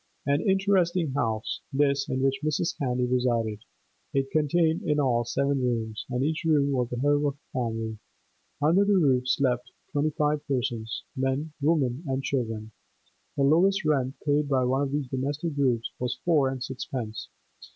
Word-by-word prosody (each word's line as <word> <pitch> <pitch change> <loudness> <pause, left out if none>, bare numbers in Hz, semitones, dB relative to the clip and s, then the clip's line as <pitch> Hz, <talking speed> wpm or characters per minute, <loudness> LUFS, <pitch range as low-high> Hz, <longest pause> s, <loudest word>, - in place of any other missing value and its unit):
An 140 +1 +2
interesting 190 -5 +2
house, 115 -6 -2
this 140 0 +1
in 130 0 -1
which 135 0 +1
Mrs. 155 +2 0
Candy 125 -2 0
resided. 120 -4 0 0.6
It 135 0 0
contained 160 +2 +2
in 150 -1 0
all 120 -4 +2
seven 140 +3 0
rooms, 115 -3 -2
and 125 0 -1
each 160 +4 -1
room 145 -3 +3
was 125 -3 0
the 125 - -3
home 145 +3 +2
of 140 -1 0
a 145 - -38
family; 115 -3 -2 0.6
under 165 +7 +4
the 200 -1 +3
roof 130 -7 +3
slept 125 -2 +1 0.2
twenty 145 +1 +1
five 150 0 0
persons, 120 -4 -2
men, 135 +3 -1
women, 145 -2 +1
and 135 0 -1
children; 115 -5 -2 0.7
the 140 - +2
lowest 180 +6 +4
rent 135 -3 +1
paid 145 0 +2
by 130 -2 +2
one 130 +2 +1
of 140 -1 -1
these 145 -2 -1
domestic 140 +5 -2
groups 125 -5 +1
was 125 -1 -2
four 150 -6 +4
and 130 -1 -4
sixpence. 125 -4 -5
135 Hz, 165 wpm, -27 LUFS, 125-150 Hz, 0.7 s, under